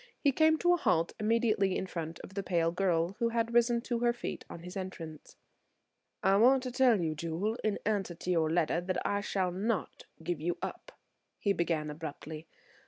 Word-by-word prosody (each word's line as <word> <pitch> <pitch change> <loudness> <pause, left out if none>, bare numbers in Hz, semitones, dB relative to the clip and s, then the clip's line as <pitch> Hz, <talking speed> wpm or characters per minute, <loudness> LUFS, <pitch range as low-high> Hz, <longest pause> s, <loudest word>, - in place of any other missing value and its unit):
He 285 - +3
came 315 +3 +4
to 350 +2 +4
a - - +3
halt 165 - +1
immediately 215 -3 +2
in - - -2
front 165 -3 -5
of 190 - -11
the 200 - -2
pale 170 -3 +1
girl, 175 0 +1
who 235 -1 +2
had 230 0 -1
risen 240 0 +4
to 240 -1 -2
her 240 0 +3
feet 240 - -5
on 165 - -8
his 180 +2 -8
entrance. 170 -5 -7 0.9
"I 195 +1 +5
want 255 +4 +5
to 255 - -3
tell 250 -4 +4
you, 160 -2 0
Jewel, 170 +8 -2
in 215 -2 +1
answer 200 -5 0
to 180 +2 -3
your 160 -3 +2
letter, 170 0 +1
that 185 +1 -2
I 205 0 +1
shall 190 -3 -1
not 200 +1 -2 0.2
give 170 -2 -2
you 175 +2 -1
up," - - -6 0.4
he 200 - +1
began 165 -4 -1
abruptly. 155 0 -7
190 Hz, 195 wpm, -31 LUFS, 170-230 Hz, 0.9 s, I